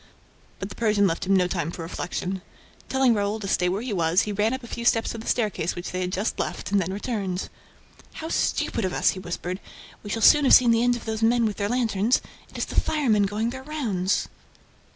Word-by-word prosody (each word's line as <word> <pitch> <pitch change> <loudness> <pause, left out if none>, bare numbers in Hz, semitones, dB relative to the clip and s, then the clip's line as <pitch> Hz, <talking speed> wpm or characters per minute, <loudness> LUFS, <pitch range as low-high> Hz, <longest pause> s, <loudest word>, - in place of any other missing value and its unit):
But 195 - -5
the - - -8
Persian 210 -3 +2
left 170 -1 -1
him 195 - +4
no 185 -1 +4
time 170 -3 -2
for 170 0 -6
reflection. 180 +2 -4 0.5
Telling 265 -2 +3
Raoul 205 0 -1
to 200 - -5
stay 180 -1 +1
where 195 +5 -2
he 250 -4 -3
was, 170 0 +2
he 210 - -3
ran 210 +2 +1
up 260 0 -4
a - - -8
few 235 - -5
steps 225 -1 +2
of 230 - -6
the - - -10
staircase 210 -7 0
which 175 - -6
they 185 - -3
had 180 0 -2
just 200 +4 -2
left - - -3
and 200 -1 +3
then 185 +1 -3
returned. 195 -3 -3 0.6
"How 320 - -6
stupid 230 - 0
of 185 -1 -1
us!" - - +3
he 185 - -7
whispered. 180 +1 -5 0.4
"We 205 - -9
shall 225 +1 -2
soon 295 -1 +7
have - - +8
seen 245 -2 +6
the 230 0 +3
end 245 0 +3
of 240 - -8
those 220 0 -3
men 230 +1 +3
with 210 -2 -2
their 205 0 -1
lanterns. 230 -1 +2 0.3
It - - -10
is - - -1
the - - +1
firemen 225 -10 +2
going 215 +4 -2
their 260 +1 -7
rounds." 230 -11 -1
210 Hz, 235 wpm, -25 LUFS, 185-235 Hz, 0.6 s, have